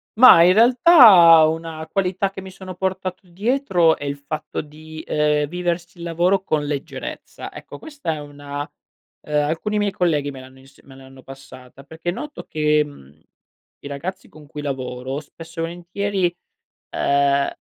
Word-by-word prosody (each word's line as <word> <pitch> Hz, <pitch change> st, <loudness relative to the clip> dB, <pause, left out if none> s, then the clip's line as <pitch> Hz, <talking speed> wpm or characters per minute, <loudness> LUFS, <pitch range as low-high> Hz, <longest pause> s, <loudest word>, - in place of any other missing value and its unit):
Mah, 230 Hz, -6 st, +8 dB
in 180 Hz, +1 st, +5 dB
realtà 225 Hz, -, +7 dB
una 160 Hz, 0 st, -4 dB
qualità 195 Hz, 0 st, -1 dB
che 195 Hz, -, -8 dB
mi 190 Hz, -, -10 dB
sono 185 Hz, 0 st, -10 dB
portato 185 Hz, 0 st, -4 dB
dietro 190 Hz, -, +1 dB
è -, -, -10 dB
il 140 Hz, 0 st, -3 dB
fatto 145 Hz, +2 st, -5 dB
di, 155 Hz, +1 st, -11 dB
ehm, 150 Hz, -1 st, +1 dB
viversi 175 Hz, +1 st, -4 dB
il -, -, -8 dB
lavoro 175 Hz, +3 st, +1 dB
con 150 Hz, -5 st, -1 dB
leggerezza, 145 Hz, -1 st, -7 dB
ecco -, -, -10 dB
questa 290 Hz, -, -5 dB
è -, -, -7 dB
una, 145 Hz, -1 st, -7 dB
uhm 150 Hz, 0 st, -19 dB
alcuni 165 Hz, +8 st, -2 dB
miei 205 Hz, -1 st, 0 dB
colleghi 155 Hz, -6 st, 0 dB
me 135 Hz, -, -10 dB
l'hanno 130 Hz, 0 st, -14 dB
ins 135 Hz, +1 st, -20 dB
me 135 Hz, -, -16 dB
l'hanno 135 Hz, 0 st, -15 dB
passata, 135 Hz, -1 st, -14 dB
perché 160 Hz, +4 st, -6 dB
noto 295 Hz, +11 st, -6 dB
che, 150 Hz, -1 st, +1 dB
mhmm, 75 Hz, -, -15 dB, 0.6 s
i -, -, -7 dB
ragazzi 170 Hz, +7 st, -6 dB
con 155 Hz, -1 st, -16 dB
cui 150 Hz, 0 st, -8 dB
lavoro, 130 Hz, -1 st, -4 dB
spesso 165 Hz, +2 st, -12 dB
e -, -, 0 dB
volentieri, 175 Hz, +2 st, -2 dB, 0.6 s
uhm 140 Hz, 0 st, +2 dB
160 Hz, 160 wpm, -21 LUFS, 145-185 Hz, 0.6 s, Mah